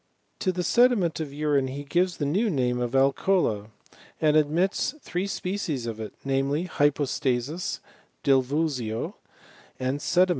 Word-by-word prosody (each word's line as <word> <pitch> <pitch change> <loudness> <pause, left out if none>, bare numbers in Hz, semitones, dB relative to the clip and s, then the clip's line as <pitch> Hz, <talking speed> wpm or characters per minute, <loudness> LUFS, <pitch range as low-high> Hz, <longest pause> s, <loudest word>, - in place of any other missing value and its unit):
To 185 - +1
the 180 0 -2
sediment 230 -8 +3
of 155 -3 -4
urine 145 -2 +1
he 140 +2 -5
gives 175 +5 +1
the 145 - -1
new 200 +11 +1
name 125 -6 0
of 120 +1 -2
alcola, 135 - +2 0.5
and 155 -1 +3
admits 165 - +2
three 185 -7 -3
species 180 -10 -3
of 115 -2 -4
it, 110 -1 -6
namely, 135 +4 0
hypos^ 145 -3 +1
tasis, 135 +6 -1 0.4
divulsio, 135 -4 +1 0.7
and 130 +2 -1
sedimen. 180 +4 +3
145 Hz, 140 wpm, -26 LUFS, 130-180 Hz, 0.7 s, sediment